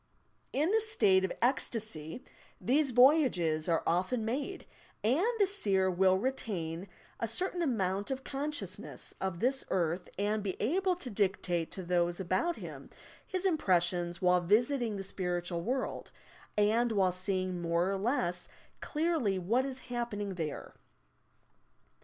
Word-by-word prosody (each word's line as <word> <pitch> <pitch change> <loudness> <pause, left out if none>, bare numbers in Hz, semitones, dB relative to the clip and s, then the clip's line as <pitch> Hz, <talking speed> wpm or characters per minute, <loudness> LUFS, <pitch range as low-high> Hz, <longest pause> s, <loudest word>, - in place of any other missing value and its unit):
In 305 +7 +1
the 445 +1 +3
state 210 - +4
of 190 - 0
"ecstasy" 220 - -1 0.4
these 280 +3 +2
voyages 245 - +4
are 165 - +2
often 185 +7 0
made, 285 +11 -3 0.4
and 255 - +3
the 410 - +5
seer 195 - +2
will 185 +1 +4
retain 190 -7 -3 0.3
a 230 - -1
certain 355 - 0
amount 200 - 0
of 265 0 -3
conseiousneM 210 - -3
of 190 -3 -2
this 265 +2 +2
earth 175 0 -1
and 210 +2 0
be 195 -2 -4
able 365 - +1
to 280 -9 -7
dictate 185 -4 0
to 190 - -5
those 175 0 0
about 190 - 0
him - - -9 0.4
his 370 0 -2
impressions 175 - +1
while 180 0 +4
visiting 230 +5 +2
the 195 - -4
spiritual 175 -2 -3
world, 255 +7 -3 0.5
and 225 +3 +3
while 190 -3 +3
seeing 185 -1 -1
more 170 +1 +1
or 195 - 0
less 180 -6 -1 0.3
clearly 300 - 0
what 225 +9 +1
is 265 -1 -2
happening 205 -5 -3
there. 160 -5 -5
200 Hz, 135 wpm, -32 LUFS, 180-260 Hz, 0.5 s, the